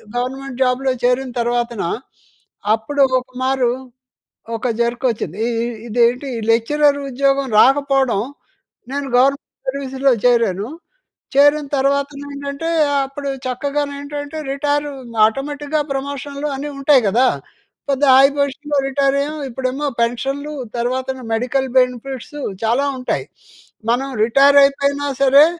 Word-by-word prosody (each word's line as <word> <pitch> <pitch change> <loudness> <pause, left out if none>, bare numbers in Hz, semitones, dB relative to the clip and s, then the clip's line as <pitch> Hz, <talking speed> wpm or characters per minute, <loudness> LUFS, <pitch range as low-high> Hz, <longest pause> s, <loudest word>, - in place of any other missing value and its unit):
Government 260 +1 -4
జాబ్‌లో 260 +1 +2
చేరిన 250 +1 +1
తర్వాతన, 240 -1 -1 0.9
అప్పుడు 280 +6 -2 0.2
ఒక 250 - -13 0.2
మారు 260 -2 +2 0.9
ఒక 235 +3 -2
జరకొచ్చింది. 235 - -1
ఇ - - 0
ఇ 235 - -1 0.2
ఇదేంటి 245 +4 +1 0.2
లెక్చరర్ 285 +6 +3
ఉద్యోగం 275 +1 +1
రాకపోడం, 270 -4 +3 0.7
నేను 280 0 -3
గవర్నమెంట్ 275 +2 0
సర్వీస్‌లో 270 0 0
చేరాను. 230 -4 +2 0.7
చేరిన 290 +1 +5
తర్వాతనేంటంటే, 280 +2 -2 0.4
అప్పుడు 275 +1 -6 0.2
చక్కగానేంటంటే 285 +3 -3
రిటైరు 290 +1 -1
ఇంక 230 -1 -10
ఆటోమేటిక్‌గా 290 +5 -2
ప్రమోషన్‌లు 280 +1 -4
అన్నీ 290 +2 -5
ఉంటాయి 275 -2 +4
గదా! 240 +6 +3 0.6
పెద్ద 275 0 0
హై 270 - +8
పొజిషన్‌లో 285 +1 -1
రిటైరయ్యాము. 280 +2 0
ఇప్పుడేమో 265 +4 -2
పెన్షన్లు 270 +5 -2 0.2
తర్వాతన 260 +2 -2 0.2
మెడికల్ 255 +3 0
బెనిఫిట్సు 255 +3 -3 0.2
చాలా 245 +6 +2
ఉంటాయి. 250 - -2 0.7
మనం 265 +3 0
రిటైరయిపోయినా 280 +3 +4
సరే, 275 +2 +7
275 Hz, 105 wpm, -19 LUFS, 250-285 Hz, 0.9 s, హై